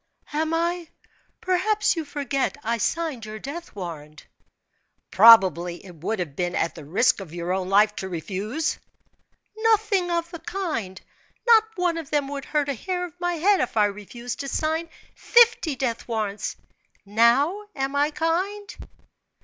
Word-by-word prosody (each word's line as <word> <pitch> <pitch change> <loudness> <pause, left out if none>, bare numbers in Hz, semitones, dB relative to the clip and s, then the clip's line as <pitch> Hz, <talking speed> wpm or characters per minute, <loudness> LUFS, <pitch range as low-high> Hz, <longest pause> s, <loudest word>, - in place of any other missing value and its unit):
"Am 315 +1 0
I? 340 +1 -1 0.5
Perhaps 415 +3 +1
you 325 -2 -3
forget 280 -1 -2
I 230 +1 -1
signed 315 -2 -2
your 215 0 -7
death 290 +7 -8
warrant." 155 -5 -8 0.9
"Probably 190 -5 +6
it 180 - -11
would 200 +8 -2
have 165 -7 -4
been 175 +1 -2
at 165 - 0
the 160 - -10
risk 190 - +2
of 175 -4 -9
your 175 +1 -2
own 185 -1 -2
life 210 +2 +4
to 190 - -4
refuse?" 200 - -3 0.8
"Nothing 435 -4 +2
of 340 0 -1
the 335 - -7
kind! 315 - -4 0.5
Not 455 -2 +6
one 350 -2 0
of 315 - -8
them 290 -2 0
would 280 -1 -5
hurt 295 -2 0
a 280 - 0
hair 360 - -3
of 355 0 -13
my 350 0 0
head 380 +4 +3
if 250 -2 -2
I 210 - +5
refused 210 +4 -6
to 275 - -4
sign 320 +4 -1 0.2
fifty 465 - +4
death 245 -3 -3
warrants! 215 -3 -3 0.5
Now, 235 - +3 0.2
am 270 0 -2
I 290 +1 +3
kind?" 370 +6 -2
275 Hz, 155 wpm, -24 LUFS, 205-340 Hz, 0.9 s, Probably